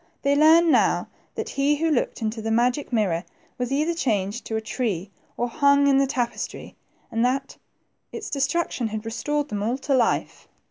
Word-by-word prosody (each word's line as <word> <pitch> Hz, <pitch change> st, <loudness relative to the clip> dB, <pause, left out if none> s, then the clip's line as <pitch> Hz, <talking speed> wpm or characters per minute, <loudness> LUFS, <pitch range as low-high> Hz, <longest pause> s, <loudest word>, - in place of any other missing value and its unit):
They 280 Hz, 0 st, +3 dB
learned 320 Hz, +3 st, +6 dB
now -, -, +2 dB, 0.3 s
that -, -, -4 dB
he 280 Hz, +2 st, +1 dB
who 320 Hz, +2 st, 0 dB
looked 245 Hz, -4 st, -1 dB
in 215 Hz, -, 0 dB
the 225 Hz, 0 st, -5 dB
magic 245 Hz, +5 st, +1 dB
mirror 190 Hz, -7 st, +1 dB, 0.4 s
was 250 Hz, +1 st, -2 dB
either 305 Hz, +5 st, +1 dB
changed 215 Hz, -, -1 dB
to 220 Hz, -, -3 dB
a -, -, +1 dB
tree 215 Hz, -4 st, -3 dB, 0.3 s
or 240 Hz, -, 0 dB
hung 280 Hz, +3 st, +3 dB
in 275 Hz, -1 st, +4 dB
the 275 Hz, -, +3 dB
tapestry, 245 Hz, -3 st, -4 dB, 0.4 s
and 230 Hz, 0 st, 0 dB
that 270 Hz, +2 st, -1 dB, 0.6 s
its 435 Hz, -, -7 dB
destruction 280 Hz, -3 st, 0 dB
had 215 Hz, 0 st, -5 dB
restored 290 Hz, +6 st, -2 dB
them 205 Hz, -1 st, -3 dB
all 235 Hz, +5 st, 0 dB
to 275 Hz, +1 st, -2 dB
life. 240 Hz, -3 st, 0 dB
250 Hz, 180 wpm, -24 LUFS, 225-285 Hz, 0.6 s, learned